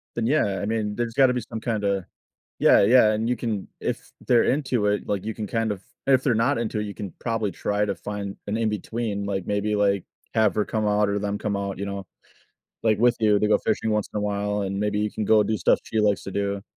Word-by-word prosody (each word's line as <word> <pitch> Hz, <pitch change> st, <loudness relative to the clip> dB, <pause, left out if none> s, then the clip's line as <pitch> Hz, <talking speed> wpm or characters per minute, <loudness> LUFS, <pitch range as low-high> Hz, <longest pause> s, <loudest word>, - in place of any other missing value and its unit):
Then, 115 Hz, -1 st, 0 dB
yeah, 105 Hz, -9 st, +1 dB
I -, -, -2 dB
mean, 105 Hz, -1 st, -1 dB
there's 120 Hz, -1 st, -2 dB
gotta 130 Hz, 0 st, +4 dB
be 125 Hz, -, -1 dB
some 115 Hz, -1 st, -6 dB
kinda 100 Hz, -5 st, -1 dB, 0.5 s
Yeah, -, -, +6 dB
yeah, 110 Hz, +1 st, +6 dB
and 110 Hz, +1 st, -1 dB
you 125 Hz, -, +2 dB
can 110 Hz, -5 st, -3 dB
if -, -, -4 dB, 0.2 s
they're 120 Hz, -2 st, +5 dB
into 130 Hz, -6 st, +1 dB
it, 105 Hz, 0 st, 0 dB
like, 100 Hz, -1 st, -2 dB
you 110 Hz, -, -2 dB
can 105 Hz, -1 st, -5 dB
kind 115 Hz, +1 st, 0 dB
of 100 Hz, -2 st, -5 dB, 0.3 s
and 135 Hz, -, +5 dB
if 130 Hz, -, -1 dB
they're 125 Hz, -5 st, +2 dB
not 115 Hz, +6 st, +2 dB
into 110 Hz, -2 st, -2 dB
it, -, -, -1 dB
you 100 Hz, -, -6 dB
can 100 Hz, -3 st, -6 dB
probably 115 Hz, -4 st, -1 dB
try 105 Hz, +4 st, -1 dB
to 100 Hz, -2 st, -2 dB
find 100 Hz, -1 st, -5 dB
an 105 Hz, +2 st, -1 dB
in-between, 110 Hz, -1 st, -2 dB
like, 95 Hz, -2 st, -3 dB
maybe, 105 Hz, +1 st, 0 dB
like, 100 Hz, -2 st, +2 dB, 0.3 s
have 110 Hz, -4 st, +4 dB
her 105 Hz, -, +2 dB
come 110 Hz, -1 st, -1 dB
out 105 Hz, 0 st, +2 dB
or 100 Hz, -, 0 dB
them 100 Hz, 0 st, -2 dB
come 105 Hz, -1 st, -1 dB
out, 100 Hz, -1 st, -3 dB
you 100 Hz, -, -2 dB
know, 100 Hz, -1 st, -5 dB, 0.8 s
like, 110 Hz, -2 st, +2 dB
with 120 Hz, +1 st, +4 dB
you 105 Hz, -2 st, +4 dB
they 105 Hz, -, +1 dB
go -, -, +4 dB
fishing 110 Hz, -, -1 dB
once 105 Hz, -1 st, 0 dB
in -, -, -2 dB
a -, -, -1 dB
while, 105 Hz, 0 st, -1 dB
and 100 Hz, 0 st, -3 dB
maybe 105 Hz, 0 st, 0 dB
you 105 Hz, 0 st, 0 dB
can 110 Hz, -, -3 dB
go 105 Hz, +1 st, +5 dB
do 110 Hz, +1 st, -1 dB
stuff -, -, +3 dB
she 110 Hz, -, -1 dB
likes 105 Hz, -2 st, +2 dB
to -, -, -5 dB
do. 100 Hz, 0 st, -2 dB
105 Hz, 255 wpm, -24 LUFS, 100-110 Hz, 0.8 s, Yeah